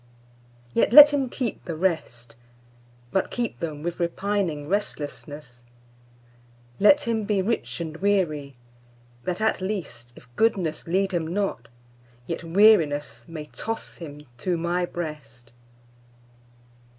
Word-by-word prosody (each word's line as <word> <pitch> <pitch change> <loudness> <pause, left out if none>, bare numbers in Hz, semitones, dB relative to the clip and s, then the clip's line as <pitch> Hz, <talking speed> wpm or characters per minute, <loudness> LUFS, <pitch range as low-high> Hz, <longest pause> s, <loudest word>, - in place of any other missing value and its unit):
Yet - - +2
let 295 +1 +11
him 270 -3 0
keep 245 -3 -4
the 170 - -4
rest, 145 -10 -2 0.8
But 190 - 0
keep 240 -2 -3
them 155 -3 -5
with 175 +1 -4
repining 170 -3 -1
restlessness; 145 - -4 1.2
Let 290 +8 +6
him 230 -5 -1
be 200 -2 0
rich 155 - -2
and 160 -2 -5
weary, 165 -8 0 0.7
that 180 +3 -2
at 220 -3 +1
least, 170 - -5
If 125 - -16
goodness 185 -10 0
lead 190 +3 +1
him 170 -3 -1
not, 195 - -2 0.6
yet 165 - -3
wearinessMay 155 - +2
toss 225 +1 -5
him 150 -3 -10
to 175 +6 -1
My 175 +1 -1
breast. 125 -9 -7
170 Hz, 115 wpm, -25 LUFS, 145-205 Hz, 1.2 s, let